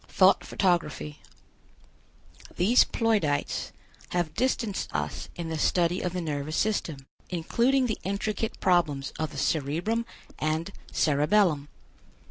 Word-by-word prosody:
THOUGHT - - +4
PHOTOGRAPHY. 165 -5 0 1.4
These 215 +8 +5
Ploidites 210 -11 0 0.4
have 175 -3 -1
distanced 230 -2 -1
us - - -3
in 170 -2 -5
the 160 -1 -3
study 175 +3 +2
of 180 - -2
the 180 - -2
nervous 150 -1 -3
system, 165 -10 -1 0.2
including 235 +10 +2
the 220 -4 -2
intricate 210 +3 -2
problems 165 -7 +1
of 155 -1 -1
the - - -10
cerebrum 170 +11 0 0.3
and 160 +4 -1 0.2
cerebellum. 150 0 +2
175 Hz, 110 wpm, -27 LUFS, 155-210 Hz, 1.4 s, These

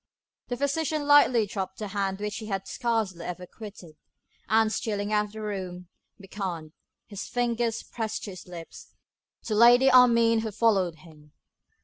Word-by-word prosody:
The 245 - -3
physician 300 +2 -1
lightly 285 -6 +5
dropped 190 -2 -5
the 210 -2 -5
hand 195 -1 -2
which 210 0 -4
he 220 -2 -7
had 195 -2 -3
scarcely 220 -9 -2
ever 180 +1 -6
quitted, 185 -6 -12 0.5
and, 220 0 +3
stealing 205 -1 -2
out 210 0 +2
of 205 - -13
the 220 - -7
room, 185 -4 -5 0.3
beckoned, 185 -6 -6 0.3
his 205 -3 -7
finger 240 -1 0 0.2
pressed 225 -2 -4
to 205 - -6
his 185 - -11
lips, 170 -2 -11 0.5
to 220 - -3
Lady 245 +4 +6
Armine 235 -3 +5
to 220 -1 -4
follow 195 -5 +2
him. 155 -2 -18
210 Hz, 155 wpm, -27 LUFS, 190-230 Hz, 0.5 s, Lady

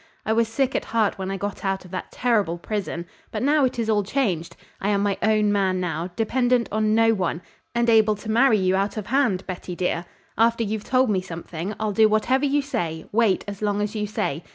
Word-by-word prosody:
I 220 - +1
was 230 0 +2
sick 255 +3 0
at - - -1
heart 220 -3 0
when 190 0 -3
I 195 - -2
got 200 +1 -5
out 195 -1 -1
of 180 - -14
that 185 - -5
terrible 210 -9 +1
prison; 185 -2 -4 0.2
but - - -3
now 290 0 +4
it 250 - -2
is 230 -2 -1
all 215 -2 +3
changed. 190 - -1 0.3
I 200 - 0
am 200 -1 +2
my 200 -1 +1
own 215 -1 +3
man 190 -2 +1
now, 175 -1 -2
dependent 245 +2 +1
on 215 0 +1
no 225 0 +4
one, 185 -5 -1 0.4
and 235 0 +2
able 220 -2 +5
to 215 +2 -6
marry 230 0 +5
you 185 -1 +2
out 195 +3 -1
of 210 - -3
hand, 235 -7 +1
Betty, 180 -1 -6
dear. 175 -1 -1 0.3
After 230 0 +3
you've 215 0 -3
told 255 -2 +2
me 190 -2 +1
something, 175 +2 -6
I'll 215 -1 -1
do 220 +1 +4
whatever 255 +6 +2
you 285 +1 +1
say, 170 - -3
wait 220 -3 +2
as 200 0 -7
long 205 -1 0
as 210 0 -2
you 210 -1 -1
say. 160 -6 -2
210 Hz, 225 wpm, -24 LUFS, 190-230 Hz, 0.4 s, able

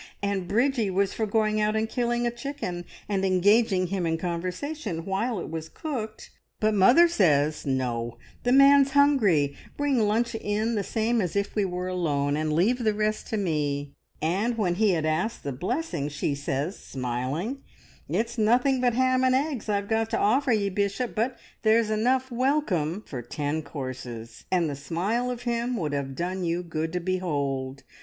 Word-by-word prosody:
And 200 -3 -1
Bridgie 235 +1 +1
was 195 +1 +1
for 220 - -1
going 215 0 +1
out 210 0 +1
and 220 0 +1
killing 240 +1 0
a 240 - +1
chicken, 240 -9 -5 0.2
and 195 -2 -1
engaging 190 +1 +3
him 180 -1 -1
in 165 0 0
conversation 180 - -4
while 200 +3 -1
it 170 - -6
was 160 0 -5
cooked, 235 -9 -6 0.3
but 215 0 +2
mother 245 - +6
says, 155 - +2
`No, 120 -3 -2 0.2
the 245 - +1
man's 275 0 +6
hungry! 205 - +4 0.2
Bring 285 -3 +1
lunch 225 +3 +1
in 220 +1 -1
the 205 -3 0
same 225 +3 0
as 180 -2 -3
if 200 0 -1
we 205 -2 +1
were 180 0 -3
alone, 145 -6 0
and 155 0 -1
leave 200 +11 +2
the 215 -2 +2
rest 215 0 -1
to 220 - -2
me.' 145 -6 -1 0.3
And 200 +9 0
when 185 -6 +1
he 210 +4 +2
had 160 -2 0
asked 160 +9 -1
the 140 - -3
blessing 180 - -2
she 145 0 -2
says, 140 +5 -3
smiling, 130 - -3 0.5
`It's 230 +1 -1
nothing 250 +4 +3
but 245 -2 +2
ham 255 0 +3
and 255 0 +4
eggs 270 -5 -1
I've 200 -1 0
got 225 0 0
to - - 0
offer 255 +6 +2
ye, 205 -3 +2
Bishop, 200 +5 -1
but 235 +3 -1 0.2
there's 220 0 +3
enough 255 +4 +1
welcome 235 - 0
for 125 -4 -6
ten 145 +5 -3
courses,' 130 -6 -7
and 175 -3 +2
the 145 - -3
smile 185 - -1
of 245 -1 -5
him 240 0 -1
would 150 -6 -2
have 135 -1 -3
done 180 +3 -2
you 170 +1 -1
good 160 -1 -3
to 180 - 0
behold. 140 -7 -2
200 Hz, 180 wpm, -26 LUFS, 160-235 Hz, 0.5 s, mother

